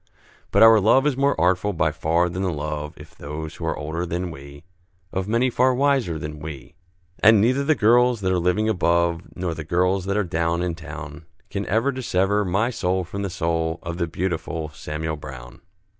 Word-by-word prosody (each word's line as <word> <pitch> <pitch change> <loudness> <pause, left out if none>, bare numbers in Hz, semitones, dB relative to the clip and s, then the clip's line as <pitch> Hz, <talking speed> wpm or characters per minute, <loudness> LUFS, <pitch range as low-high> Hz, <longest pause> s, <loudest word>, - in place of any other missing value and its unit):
But - - +5
our 115 -1 +8
love 120 +7 +4
is 150 -3 +2
more 140 -7 +1
artful 95 +4 +2
by 80 -2 +1
far 85 +2 +1
than 90 +2 -4
the 95 -2 0
love 75 -1 -4
If - - -13
those 75 +2 -7
who 80 - -4
are - - -1
older 80 +3 -3
than 90 +1 -3
we, 70 0 -11 0.5
Of 95 0 -2
many 120 +4 +1
far 130 +1 +3
wiser 135 - +1
than 75 0 -6
we, 75 0 -8 0.5
And 110 0 +6
neither 130 +6 +2
the 155 +2 +3
girls 120 0 +4
that 95 -1 0
are 90 - +2
living 90 +5 +1
above, 85 -4 +1
Nor 90 -2 -2
the 80 -1 -6
girls 90 +3 +1
that 100 +1 -1
are 105 - +2
down 85 0 -1
in 90 -1 -1
town, 80 -1 -9 0.2
Can 100 0 -3
ever 115 +7 +1
dissever 105 -5 0
my 100 +6 0
soul 95 -4 -1
from 100 +3 -6
the 100 - -2
soul 85 -2 -1
Of 85 +1 -5
the 85 - 0
beautiful 80 -2 -3
Samuel 75 +1 -5
Brown. 60 -4 -10
90 Hz, 200 wpm, -23 LUFS, 80-105 Hz, 0.5 s, our